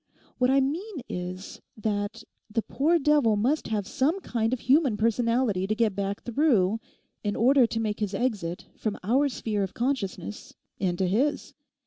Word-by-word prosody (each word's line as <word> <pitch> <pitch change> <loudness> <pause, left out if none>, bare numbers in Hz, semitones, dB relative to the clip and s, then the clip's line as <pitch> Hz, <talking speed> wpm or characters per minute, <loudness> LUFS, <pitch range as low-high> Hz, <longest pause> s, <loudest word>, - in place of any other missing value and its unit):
What 250 0 +3
I 270 +1 +4
mean 325 +5 -3
is 180 +1 -6 0.2
that 210 +1 -2 0.3
the 225 +1 -1
poor 320 +5 +2
devil 290 -7 +3
must 255 +9 +1
have 210 -3 -1
some 305 - +1
kind 225 -6 -1
of 255 - -2
human 265 -4 +3
personality 230 -3 +1
to 215 - 0
get 220 -3 +1
back 200 0 -3
through 225 -6 +2 0.4
in 205 -1 -1
order 255 +1 +5
to 225 - -3
make 215 -2 -2
his 205 -2 -2
exit 195 -7 -2
from 215 -2 -3
our 265 +8 +3
sphere 215 -5 -2
of 190 -2 -3
consciousness 235 -5 -3 0.2
into 185 -1 0
his. 245 +11 0
225 Hz, 160 wpm, -27 LUFS, 205-265 Hz, 0.4 s, order